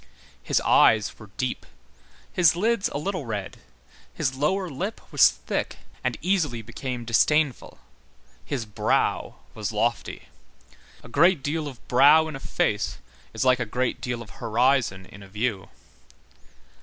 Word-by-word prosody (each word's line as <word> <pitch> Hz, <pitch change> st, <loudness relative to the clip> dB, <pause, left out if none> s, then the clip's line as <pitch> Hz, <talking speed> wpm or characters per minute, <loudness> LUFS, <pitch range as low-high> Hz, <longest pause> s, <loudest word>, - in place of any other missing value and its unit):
His -, -, +1 dB
eyes 110 Hz, -2 st, +4 dB
were 110 Hz, -, -12 dB
deep, 130 Hz, -2 st, -2 dB, 0.7 s
his 170 Hz, -3 st, +4 dB
lids 220 Hz, +3 st, +1 dB
a -, -, -4 dB
little 180 Hz, -3 st, -3 dB
red, 105 Hz, -4 st, -5 dB, 0.5 s
his 135 Hz, -4 st, -2 dB
lower 180 Hz, +8 st, 0 dB
lip 180 Hz, +9 st, -4 dB
was -, -, +7 dB
thick -, -, -4 dB, 0.3 s
and -, -, -1 dB
easily 155 Hz, -, 0 dB
became 120 Hz, +2 st, -6 dB
disdainful, 140 Hz, +4 st, +1 dB, 0.7 s
his 130 Hz, -5 st, -3 dB
brow 105 Hz, -, 0 dB, 0.2 s
was -, -, -4 dB
lofty. -, -, -2 dB, 0.8 s
A -, -, -11 dB
great 155 Hz, +5 st, +3 dB
deal 155 Hz, +1 st, -2 dB
of 130 Hz, -4 st, -11 dB
brow 150 Hz, +5 st, +6 dB
in 155 Hz, -, -6 dB
a -, -, -6 dB
face 105 Hz, -5 st, -1 dB, 0.4 s
is 110 Hz, -, -1 dB
like 130 Hz, -1 st, +4 dB
a -, -, 0 dB
great 125 Hz, +3 st, -2 dB
deal 120 Hz, -2 st, -3 dB
of 105 Hz, -, -16 dB
horizon 120 Hz, -4 st, +1 dB
in 100 Hz, -, -14 dB
a 100 Hz, -, -12 dB
view. 105 Hz, 0 st, -3 dB
130 Hz, 145 wpm, -25 LUFS, 115-155 Hz, 0.8 s, was